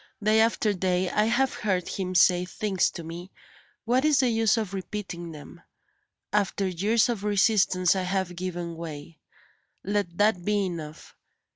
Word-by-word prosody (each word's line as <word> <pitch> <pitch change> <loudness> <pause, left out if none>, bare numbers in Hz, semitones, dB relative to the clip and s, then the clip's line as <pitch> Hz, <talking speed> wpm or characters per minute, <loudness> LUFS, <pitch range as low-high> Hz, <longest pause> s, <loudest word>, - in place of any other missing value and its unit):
Day 215 +1 +4
after 220 -1 +2
day 185 -1 0
I 210 - +2
have 245 +4 +1
heard 185 -4 -1
him 185 -1 -4
say 180 0 +5
things 195 0 0
to 170 - -8
me 170 +3 -8 0.6
what 250 +3 +2
is 300 -3 +3
the 255 - +2
use 225 -1 +2
of 210 -4 -3
repeating 185 -3 -6
them? 150 -2 -12 0.7
After 200 -1 +1
years 205 +6 +2
of 230 -5 -3
resistance 195 -3 +3
I 190 - 0
have 185 -1 -2
given 175 -1 -5
way; 160 -1 -8 0.6
let 195 -3 -2
that 205 -4 +2
be 205 0 +1
enough. 160 -4 -7
190 Hz, 155 wpm, -26 LUFS, 175-215 Hz, 0.7 s, say